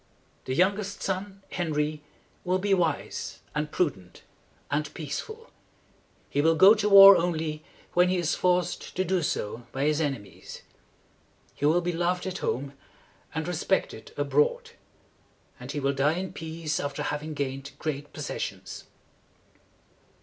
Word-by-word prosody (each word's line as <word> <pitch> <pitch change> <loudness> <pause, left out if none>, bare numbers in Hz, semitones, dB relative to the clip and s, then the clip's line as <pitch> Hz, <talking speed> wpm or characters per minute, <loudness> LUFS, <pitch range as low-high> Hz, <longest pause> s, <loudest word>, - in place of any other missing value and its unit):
"The 130 - -2
youngest 200 +4 +1
son, 195 +1 -4
Henry, 155 -3 -1 0.4
will 185 0 +1
be 195 +1 +1
wise 170 -5 -1
and 150 0 -2
prudent 95 - -2 0.5
and 150 +1 -1
peaceful. 435 - -6 0.8
He 145 - 0
will 165 +2 +4
go 190 +6 +8
to 210 -1 0
war 200 0 +11
only 160 -3 -1 0.3
when 180 +1 +4
he 185 - +1
is 175 -2 0
forced 180 -1 0
to 185 - 0
do 185 -1 +1
so 115 -5 -3
by 135 - -2
his 150 +1 +2
enemies. 135 -9 -5 0.9
He 145 - 0
will 170 +4 +3
be 175 0 -2
loved 175 +2 0
at 190 0 -4
home, 140 +2 -2 0.6
and 160 0 -2
re 180 - -2
spect - - 0
ed 455 - -11
abroad; 475 +1 +1 0.9
and - - -7
he 150 - -3
will 140 0 +1
die 140 +3 +2
in 185 0 -4
peace 160 -1 -4
after 145 +1 -3
having 150 +1 -3
gained 135 0 -4
great 145 -1 -4
pos - - -6
ses - - -4
sions." - - -6
165 Hz, 150 wpm, -27 LUFS, 145-185 Hz, 0.9 s, war